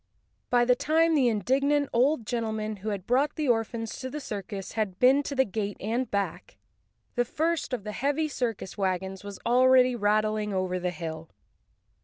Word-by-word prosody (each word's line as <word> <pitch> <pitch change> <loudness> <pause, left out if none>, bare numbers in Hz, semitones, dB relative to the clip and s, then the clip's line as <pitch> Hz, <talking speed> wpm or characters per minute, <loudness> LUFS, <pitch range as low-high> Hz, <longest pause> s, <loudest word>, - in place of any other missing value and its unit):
By 245 -1 +4
the 250 - +5
time 325 +5 +2
the 275 -5 +4
indignant 275 +7 +1
old 250 0 +2
gentleman 220 -2 -2
who 205 +3 -5
had 200 -3 -4
brought 275 +5 +1
the 305 -2 -1
orphans 225 -1 -1
to 260 - -5
the 300 - -5
circus 200 -6 -6
had 210 -5 -2
been 265 +3 +5
to 285 0 -5
the 265 0 +3
gate 205 0 -3
and 230 +4 -2
back, 200 - -3 0.6
the 245 - +2
first 320 +6 -1
of 245 -5 -3
the 210 - -5
heavy 285 +7 0
circus 235 -9 -3
wagons 190 0 -2
was 200 -1 -7
already 255 +1 +5
rattling 215 -1 +1
over 185 -1 -1
the 180 0 -1
hill. 165 -2 -6
230 Hz, 175 wpm, -27 LUFS, 205-265 Hz, 0.6 s, the